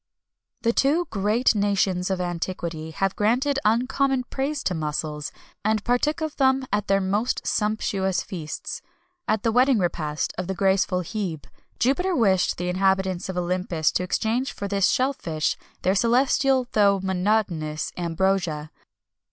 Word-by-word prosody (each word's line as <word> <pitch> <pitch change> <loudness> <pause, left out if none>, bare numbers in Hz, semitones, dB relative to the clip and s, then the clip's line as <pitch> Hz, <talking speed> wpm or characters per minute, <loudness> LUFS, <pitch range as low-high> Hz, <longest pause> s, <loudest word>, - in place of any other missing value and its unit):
The 230 0 +2
two 300 +8 +2
great 215 +5 +2
nations 200 -3 +1
of 190 -1 -1
antiquity 170 -2 -4
have 195 +4 -1
granted 255 +7 +1
uncommon 255 +4 +2
praise 280 +2 -2
to 185 - 0
mussels, 150 -2 -3 0.3
and 215 0 +1
partook 270 +7 +1
of 315 -1 -3
them 265 -1 +3
at 205 0 0
their 195 0 +3
most 205 +5 -1
sumptuous 200 -3 0
feasts. 185 - -6 0.5
At 215 -1 +1
the 225 - +2
wedding 250 +2 +4
repast 160 -5 -1
of 180 - -3
the 190 - -2
graceful 190 -1 +2
Hebe, 175 -5 -4 0.3
Jupiter 355 +9 +1
wished 195 - +2
the 180 - -3
inhabitants 190 0 +1
of 185 - -4
Olympus 175 -3 0
to - - 0
exchange 225 +8 -1
for 200 - -5
this 200 -1 +2
shell 260 +2 +2
fish 160 - -2 0.3
their 185 - +3
celestial 260 +4 +3
though 200 -2 +4
monotonous 185 -5 -1
ambrosia. 170 -3 -1
195 Hz, 145 wpm, -24 LUFS, 180-245 Hz, 0.5 s, wedding